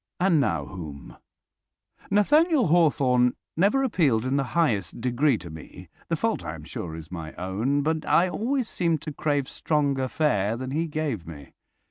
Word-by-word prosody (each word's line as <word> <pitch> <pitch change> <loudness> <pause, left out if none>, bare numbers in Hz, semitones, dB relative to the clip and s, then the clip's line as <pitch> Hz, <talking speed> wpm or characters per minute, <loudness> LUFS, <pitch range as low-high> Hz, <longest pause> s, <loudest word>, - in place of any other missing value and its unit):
And 175 -3 +3
now 85 - 0
whom? 80 -6 -9 0.9
Nathaniel 295 - +4
Hawthorne 135 -7 +3 0.2
never 205 +11 +3
appealed 145 - +2
in 130 +1 0
the 140 - +2
highest 105 - +1
degree 125 +2 +2
to 85 -4 -9
me. 80 0 -11 0.2
The - - 0
fault, - - -1
I - - -5
am - - -11
sure, 80 -2 -6
is 80 +1 -10
my 80 -3 -6
own, 110 +11 -1
but 160 +1 0
I 180 - +4
always 240 +6 -1
seemed 165 -7 0
to 155 - -5
crave 145 -2 0
stronger 140 -4 0
fare 115 -8 0
than 130 +1 -5
he 160 +4 -1
gave 145 - -3
me. 75 -4 -11
140 Hz, 165 wpm, -25 LUFS, 105-165 Hz, 0.9 s, Nathaniel